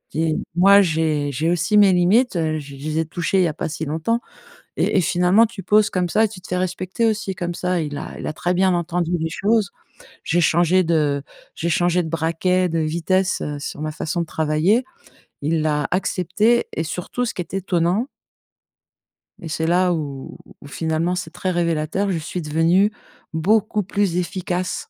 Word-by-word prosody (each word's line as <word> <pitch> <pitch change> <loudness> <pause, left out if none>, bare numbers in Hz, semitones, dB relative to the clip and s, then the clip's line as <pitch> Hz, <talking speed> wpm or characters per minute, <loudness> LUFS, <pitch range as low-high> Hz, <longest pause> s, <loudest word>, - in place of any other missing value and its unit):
et 160 0 +1 0.2
moi, 200 +3 +7
j'ai 155 -4 0
j'ai 155 +5 0
aussi 175 +4 +1
mes 200 -2 +6
limites, 200 +8 +3
heu, 160 -2 0
je 140 -2 -8
les 155 +3 -4
ai 160 - +1
touchées 175 +4 -1
il - - +4
y - - +3
a 155 - -3
pas - - -4
si 160 +1 -4
longtemps» 165 +11 -1 0.6
et - - +1
et - - +4
finalement 180 +6 +4
tu 215 -3 -8
poses 210 +3 +4
comme 180 -1 0
ça 215 +5 +3
et - - 0
tu 200 -2 -10
te - - -13
fais 180 - -2
respecter 185 +4 -2
aussi 210 -3 -1
comme 175 -2 -3
ça, 180 0 -1
il 145 -2 -4
a - - -7
il - - -6
a - - -1
très 175 +2 -1
bien 185 +1 +3
entendu 175 0 -1
les 160 0 -2
choses. 205 +4 +1 0.5
J'ai 175 - +1
changé 175 +3 +3
de 150 -4 +1 0.3
j'ai 170 - -3
changé 175 +1 +2
de 160 - -5
braquet, 170 +3 0
de 165 -1 -1
vitesse 175 +5 0 0.2
sur 145 - -6
ma 155 0 -3
façon 160 +3 -2
de - - -5
travailler, 160 +10 +1 0.6
il 155 +2 0
l'a 150 -2 0
accepté 195 +5 +1
et 160 - -2
surtout 180 +9 -4
ce 230 - -3
qui - - -4
est 170 - -10
étonnant 185 +4 0 1.3
et 165 - -7
c'est 160 +1 -1
là 180 +1 +3
où 140 -5 -5 0.2
où - - -11
finalement 160 +4 -1
c'est 180 -2 -4
très 180 +1 -3
révélateur, 170 +2 0
je 175 - -1
suis 165 +3 -5
devenu 165 +6 +2 0.4
beaucoup 210 +5 +1
plus 195 -2 0
efficace 180 0 -3
175 Hz, 195 wpm, -21 LUFS, 160-190 Hz, 1.3 s, moi